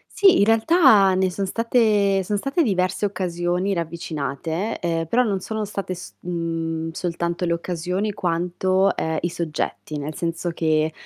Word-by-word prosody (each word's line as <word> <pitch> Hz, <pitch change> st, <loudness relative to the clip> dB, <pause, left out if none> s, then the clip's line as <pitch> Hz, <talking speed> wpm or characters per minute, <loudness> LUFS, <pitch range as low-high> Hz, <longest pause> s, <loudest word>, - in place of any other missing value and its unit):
Sì, 390 Hz, -2 st, +6 dB
in 200 Hz, -, +5 dB
realtà 225 Hz, -, +5 dB
ne 185 Hz, 0 st, +2 dB
son 195 Hz, +2 st, -3 dB
state 210 Hz, -3 st, +2 dB
son 205 Hz, +3 st, -1 dB
state 275 Hz, -, 0 dB
diverse 190 Hz, -2 st, 0 dB
occasioni 180 Hz, 0 st, -1 dB
ravvicinate, 165 Hz, +2 st, -3 dB
uhm, 165 Hz, -1 st, -1 dB
però 240 Hz, +10 st, +2 dB
non 200 Hz, -5 st, 0 dB
sono 220 Hz, +1 st, -3 dB
state 200 Hz, -2 st, -4 dB
s 180 Hz, -, -10 dB
mhmm, 165 Hz, -2 st, -3 dB
soltanto 170 Hz, +1 st, -2 dB
le 170 Hz, -, +1 dB
occasioni 180 Hz, +4 st, -2 dB
quanto, 185 Hz, +1 st, +1 dB
uhm, 160 Hz, 0 st, -1 dB
i 175 Hz, -, 0 dB
soggetti, 155 Hz, -2 st, -4 dB
nel 150 Hz, +2 st, -5 dB
senso 170 Hz, +1 st, -2 dB
che, 155 Hz, -1 st, +1 dB
180 Hz, 150 wpm, -23 LUFS, 165-200 Hz, -, Sì